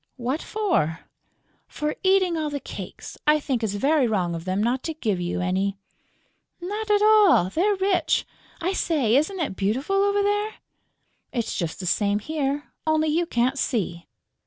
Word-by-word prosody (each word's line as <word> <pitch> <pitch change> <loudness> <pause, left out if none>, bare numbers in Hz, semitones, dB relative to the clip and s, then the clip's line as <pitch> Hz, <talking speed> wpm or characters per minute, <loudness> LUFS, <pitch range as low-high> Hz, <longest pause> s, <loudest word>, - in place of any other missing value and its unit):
"What 255 +5 -2
for?" 355 - 0 0.7
"For 300 0 -3
eating 375 -2 +3
all 310 -2 -1
the 290 -1 -3
cakes. - - -9
I 305 0 +5
think 260 -5 -2
it's 205 -2 -1
very 275 +4 +2
wrong 185 -6 0
of 165 0 -6
them 190 +2 0
not 245 +3 0
to 320 - -3
give 210 - -1
you 175 +1 -2
any." 190 +2 0 0.8
"Not 415 +5 -4
at 415 0 +4
all; 420 - +5
they're 405 - +2
rich!... 385 -1 +1 0.3
I 365 +2 -1
say, 275 - +1
isn't 320 +8 +1
it 295 - -2
beautiful 255 - 0
over 405 +1 +2
there?" 415 +1 0 0.8
"It's 235 -4 -2
just 170 -3 -3
the 185 - -5
same 205 +3 +1
here, 290 +4 -3
only 315 0 +2
you 335 +3 +1
can't 255 0 +1
see...." 180 -10 -2
290 Hz, 165 wpm, -24 LUFS, -, 0.8 s, I